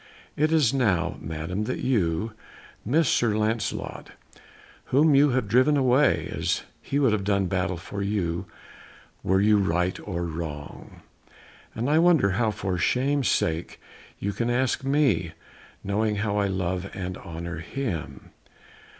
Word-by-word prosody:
It 155 +2 +1
is 150 -7 +3
now, 105 -11 +1
Madam, 80 +7 -4
that 130 - -2
you 110 -5 0 0.5
miss 150 +7 +2
Sir 115 -4 +2
Lancelot, 110 0 -2 0.7
whom 150 +3 +4
you 145 +2 +5
have 125 -4 0
driven 130 +7 +4
away, 130 +2 +3
as - - -1 0.2
he 140 - -2
would 135 -5 +3
have 105 -2 0
done 100 -1 +1
battle 90 -1 -1
for 100 +4 -6
you 95 -4 -2 0.7
were 95 +1 +2
you 105 +1 +4
right 90 -1 0
or 85 -3 -2
wrong, 80 -3 -7 0.7
and 115 +3 -2
I 155 +2 +4
wonder 165 - +4
how 110 +4 +1
for 95 -3 -3
shame's 135 - +1
sake 80 +1 -1 0.4
you 100 +1 -3
can 120 +3 -1
ask 130 +2 0
me, 135 - +1 0.5
knowing 105 +2 0
how 105 0 -1
I 100 -1 +2
love 95 0 -2
and 90 -1 -4
honour 85 -1 -6
him." 80 - -5
105 Hz, 140 wpm, -25 LUFS, 90-130 Hz, 0.7 s, you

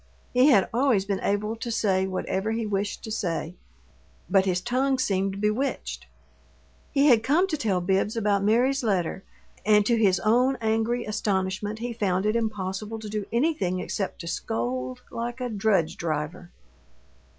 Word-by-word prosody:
He 250 +2 +5
had 205 -10 +5
always 240 -6 +2
been 200 -1 -1
able 210 +2 -1
to 235 - -5
say 190 -4 +1
whatever 190 +3 -2
he 225 0 -2
wished 205 0 -2
to 220 - -6
say, 170 -5 -2 0.7
but 195 -1 +3
his 180 -1 +1
tongue 260 +7 0
seemed 195 -5 0
bewitched. 210 - -2 0.8
He 280 +1 +3
had 240 -6 +6
come 300 +10 +3
to 315 - 0
tell 205 -10 0
Bibbs 195 +5 0
about 200 -2 +1
Mary's 245 +6 +2
letter, 190 -3 0 0.4
and 210 -1 +4
to 235 - +3
his 195 -4 +3
own 250 +5 +3
angry 225 +2 0
astonishment 205 0 -1
he 235 +1 -4
found 195 -4 0
it 215 +1 +1
impossible 210 -1 -2
to 220 -1 -7
do 210 -1 -3
anything 235 - +1
except 195 0 -3
to 170 - -8
scold 125 -3 -3
like 240 +2 -4
a 250 -1 -2
drudge 200 -6 +1
driver. 165 +2 -3
210 Hz, 160 wpm, -26 LUFS, 190-235 Hz, 0.8 s, had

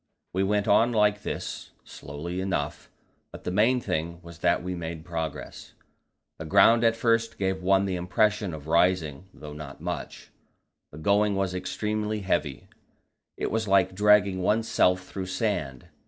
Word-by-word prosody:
We 95 - 0
went 100 +1 +1
on 120 +2 +4
like 105 -2 +2
this, - - -6
slowly 85 +6 -6
enough, 85 -5 -3 0.4
but - - -11
the - - -3
main 115 +7 +3
thing 85 -5 -3
was 85 -1 -12
that - - +1
we 90 0 -3
made 80 -2 -6
progress. 80 -3 -6 0.7
The 80 - -6
ground 100 +7 +5
at 115 0 +4
first 115 0 +1
gave 95 -1 -1
one 95 +1 +3
the 95 -2 -2
impression 100 +2 +1
of 75 -2 -10
rising, 85 -2 +1
though 75 -4 -10
not 75 -2 -9
much. - - -6 0.6
The 75 - -11
going 100 +5 +2
was 95 -1 -1
extremely 105 +3 -2
heavy; 85 -8 -2 0.7
it - - -2
was 110 -1 -1
like 95 -1 +3
dragging 100 -1 +4
oneself 90 -3 +2
through 95 -1 -6
sand. 95 - -2
95 Hz, 155 wpm, -26 LUFS, 85-105 Hz, 0.7 s, ground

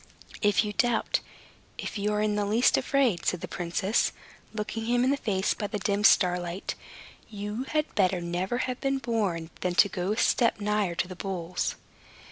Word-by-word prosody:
"If 205 0 +4
you 210 - -3
doubt, 240 +1 +1 0.6
if - - -5
you 210 0 0
are 210 0 +1
in 210 -1 +1
the 210 - +1
least 220 +5 +3
afraid," 260 - +1
said 180 - 0
the - - -4
princess, 180 +4 0 0.4
looking 220 +1 -4
him 245 +1 +2
in 260 - +3
the - - +3
face 200 -8 0
by 205 - -4
the 210 - -3
dim 205 +1 0
starlight, 180 -2 +3 0.6
"you 210 +3 -4
had 305 +2 -1
better 185 -3 +2
never 175 +6 -2
have 255 -1 -4
been 275 -1 +1
born 200 -10 -1
than 180 -1 -1
to 200 - +6
go 185 0 -2
a - - -5
step 235 -1 +2
nigher 205 -4 0
to 175 - -1
the 185 - -8
bulls." 180 -2 -3
205 Hz, 185 wpm, -28 LUFS, 180-230 Hz, 0.6 s, to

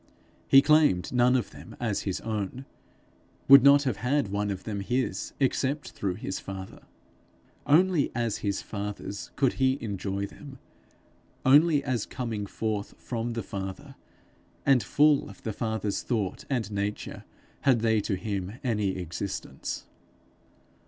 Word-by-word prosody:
He 135 0 +7
claimed 150 - +3
none 125 +1 +4
of 125 - -1
them - - -12
as 110 -5 -1
his 95 - -2
own, 110 +4 -4 0.8
would 140 0 +10
not 140 +2 +7
have 130 -7 -1
had 135 -2 0
one 105 +1 -1
of 95 -2 -4
them 105 -2 -4
his 125 +6 -2
except 140 +2 0
through 95 -3 -3
his 95 0 -4
father. 95 -1 -8 0.9
Only 170 0 +4
as 115 -3 0
his 100 -1 -2
father's 100 -1 -5
could 135 -3 +2
he 130 +1 +3
enjoy 100 -2 -3
them; 135 +6 -11 0.9
only 145 +2 +5
as 125 -6 -1
coming 110 -5 -4
forth 105 -1 -3
from 120 -1 -4
the 115 -2 -3
Father, 95 -1 -6 0.7
and 135 -3 +5
full 145 -1 +3
of 100 - -14
the 110 - -3
Father's 110 -2 -2
thought 110 -7 -2
and 115 -7 -1
nature, 100 +1 -3 0.4
had 130 -5 +3
they 110 -2 +3
to 100 - -1
him 100 -1 -4
any 105 -6 0
existence. 90 +2 -5
110 Hz, 140 wpm, -28 LUFS, 100-130 Hz, 0.9 s, would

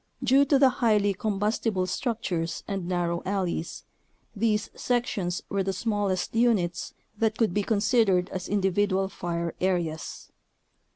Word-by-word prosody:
Due 265 +3 +5
to 280 - +4
the 270 -1 +6
highly 210 -3 +3
combustible 210 -1 0
structures 185 -4 -2
and 195 -3 -3
narrow 175 -1 -1
alleys, 185 -4 -2 0.5
these 210 0 0
sections 215 -8 -1
were 200 - -1
the 195 0 0
smallest 200 -2 -1
units 200 -7 +1 0.2
that 220 -1 +1
could 220 -6 +2
be 205 - +1
considered 205 -3 +2
as 185 -1 -5
individual 195 -1 +1
fire 170 -3 -3
areas. 175 -4 -2
195 Hz, 125 wpm, -27 LUFS, 180-220 Hz, 0.5 s, the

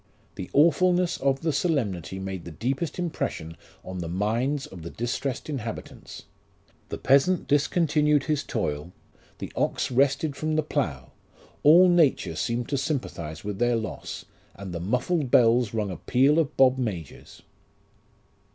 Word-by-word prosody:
The 90 - -7
awfulness 175 +3 +3
of 135 0 0
the 160 -2 0
solemnity 110 - -1
made 95 -2 -5
the - - -8
deepest 130 - -3
impression 155 - -3 0.3
on 95 0 -6
the 85 - -4
minds 115 - -1
of 90 - -11
the 85 - -7
distressed 120 +4 -3
inhabitants. 120 -7 -7 0.7
The - - -4
peasant 140 +7 +3
discon 145 +4 +2
tinued 150 -2 +2
his 150 -1 0
toil, 80 -6 -3 0.4
the - - -7
ox - - -1
rested 140 +3 +2
from 155 +2 -2
the 155 - +1
plough; 115 - -3 0.5
all 170 +5 +7
nature 170 -6 +3
seemed 120 0 -2
to 140 - 0
sympathize 85 - -4
with 105 -1 -5
their 120 0 +2
loss, 110 -1 -5 0.3
and 95 -2 -8
the 85 - -3
muffled 125 - -1
hells 115 -2 +4
rung 105 -3 -2
a 90 - -6
peal 140 +5 +3
of 155 -2 -1
bob 130 0 +5
majors." 95 - -6
130 Hz, 150 wpm, -26 LUFS, 100-150 Hz, 0.7 s, all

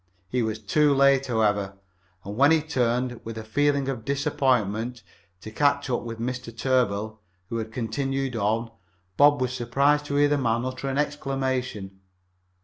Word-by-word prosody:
He 125 +3 0
was 110 -1 -1
too 140 +7 +2
late, 135 0 +4
however, 105 -4 0 0.5
and 100 +1 -6
when 140 +5 +5
he 160 0 +5
turned, 125 -4 -1
with 115 0 -7
a 110 - -5
feeling 140 +4 +1
of 130 -5 -3
disappointment, 125 -4 0 0.4
to 110 - -8
catch 140 +2 +1
up 120 - 0
with 115 -1 -6
Mr. 125 +1 -3
Tarbill, 110 -3 0 0.3
who 115 - -3
had 110 -1 -4
continued 135 +2 -2
on, 115 +2 0 0.4
Bob 145 +4 +5
was 125 -1 -1
surprised 140 +5 +1
to 140 - -3
hear 145 0 +4
the 145 0 +1
man 115 -1 0
utter 130 +1 -4
an 135 - -2
exclamation. 130 -9 -2
125 Hz, 160 wpm, -25 LUFS, 110-140 Hz, 0.5 s, when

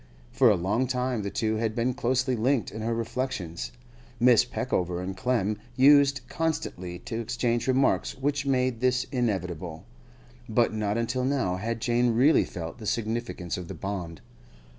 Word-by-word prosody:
For 125 - +5
a 105 - +5
long 105 +8 0
time 125 -2 -1
the 100 - -3
two 110 +1 -1
had 110 -1 -1
been 120 +2 +1
closely 130 +1 0
linked 120 +1 +1
in 110 - -6
her 115 +1 -1
reflections; 115 -7 -3 0.5
Mrs. 120 -1 +5
Peckover 90 -1 -1
and 95 +1 -4
Clem 105 -1 0 0.2
used 140 0 +6
constantly 125 - -3
to 115 +5 -5
exchange 120 +1 -1
remarks 130 +1 +2
which 140 +1 0
made 130 -3 +1
this 125 0 +2
inevitable. 90 - -2 0.6
But 115 0 +2
not 105 0 -1
until 120 +2 -1
now 130 -9 0
had 115 +3 -3
Jane 120 0 +2
really 135 +7 +5
felt 85 +5 -7
the 110 - -6
significance 110 -6 -2
of 90 -2 -6
the - - -7
bond. 90 -5 -5
115 Hz, 160 wpm, -27 LUFS, 100-130 Hz, 0.6 s, used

